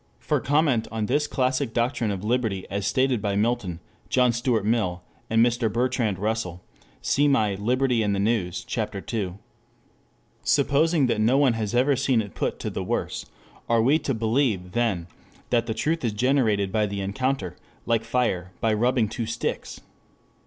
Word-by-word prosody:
For - - 0
comment 145 -5 +2
on 110 -1 -1
this 145 +6 +1
classic 130 -2 0
doctrine 120 -1 0
of 100 -1 -3
liberty 110 -4 0
as 100 0 -1
stated 130 +1 +1
by 100 -1 -1
Milton, 105 -5 0 0.3
John 125 -1 +4
Stuart 120 -3 0
Mill, 105 -6 0 0.3
and 115 +1 +4
Mr. 120 -2 0
Bertrand 120 -4 0
Russel, 95 -4 -2 0.4
see 145 +1 +3
my 110 -8 +2
Liberty 125 +4 +1
and 105 -2 +1
the - - -1
News, 100 -4 0
Ch. - - -3 0.3
II.] 100 -6 -1 1.1
Supposing 155 +1 +3
that 115 -3 0
no 120 +5 +4
one 140 -4 +4
has 110 0 -2
ever 135 +3 +3
seen 130 -2 +2
it 100 -3 -4
put - - -2
to - - -3
the - - -3
worse, - - -3 0.4
are 115 -1 +3
we 145 +6 +4
to 135 -4 -2
believe 110 -5 0
then 110 -7 0 0.5
that 120 -1 +2
the 110 - -2
truth 160 +4 -1
is 115 -3 0
generated 110 -5 +2
by 105 -1 +1
the 100 0 -4
encounter, 100 0 -2 0.3
like 115 -1 +1
fire 115 -7 -1
by 110 -1 +1
rubbing 120 +1 +2
two 110 +1 -4
sticks? 115 +1 -4
115 Hz, 170 wpm, -25 LUFS, 105-130 Hz, 1.1 s, John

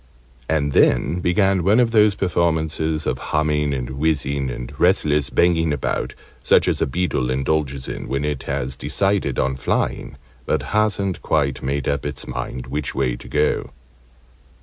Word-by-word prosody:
And 75 -2 +1
then 70 +7 +3
began 95 +1 +2
one 105 +6 +4
of 120 -2 +3
those 105 -3 +4
performances 80 -3 0
of - - -1
humming, 75 -1 +1
and 65 -2 -3
whizzing, 70 -1 0
and - - -6
restless 75 -6 +3
banging 85 -2 +2
about, 70 -3 -2 0.3
such - - +4
as - - 0
a - - +2
beetle 70 -5 -1
indulges 70 0 -1
in - - -5
when 70 +2 -1
it 75 -3 -2
has 65 +2 -2
decided 75 +1 0
on 65 0 +1
flying, 70 +1 -2 0.3
but - - 0
hasn't 100 -3 +1
quite 70 -4 0
made 70 +1 -2
up 70 0 0
its 70 -2 -5
mind 65 - -5
which 75 -1 -4
way 60 -2 0
to - - -11
go. 75 0 0
75 Hz, 155 wpm, -21 LUFS, 70-85 Hz, 0.3 s, one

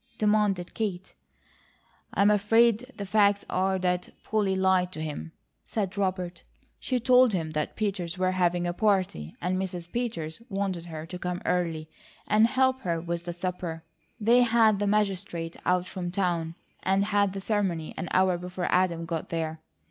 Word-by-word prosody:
demanded 210 -4 +1
Kate. 190 -5 -3 1.0
"I'm 200 +1 +5
afraid 225 +4 +3
the 200 - -5
facts 200 0 +3
are 190 +1 +1
that 180 -1 -1
Polly 205 -3 +1
lied 190 -1 +2
to - - -6
him," 145 - -5 0.3
said 200 -4 -3
Robert. 185 -3 -2 0.4
"She 255 -1 -1
told 250 -1 +5
him 165 -4 -1
that 155 -1 -2
Peters 190 -4 -2
were 185 0 +2
having 175 -1 +1
a 175 - -1
party, 185 - 0
and 180 +1 0
Mrs. 180 -2 -4
Peters 215 -8 -3
wanted 195 -4 -2
her 160 -2 -7
to 180 +2 -7
come 180 0 -3
early 165 -3 0 0.4
and 215 +2 +5
help 260 +1 +2
her 170 -2 -1
with 170 0 -4
the 175 - -3
supper. 175 -2 -4 0.4
They 235 +3 +5
had 225 -3 +4
the 205 - 0
Magistrate 195 -5 -1
out 180 0 +2
from 185 -1 -5
town 175 -3 -1 0.3
and 195 +1 +2
had 205 -2 +2
the 195 - -4
ceremony 190 -7 -1
an 180 - -4
hour 185 -1 +3
before 180 0 -4
Adam 175 -2 +2
got 165 -1 -4
there. 160 -1 -3
185 Hz, 165 wpm, -27 LUFS, 175-205 Hz, 1.0 s, I'm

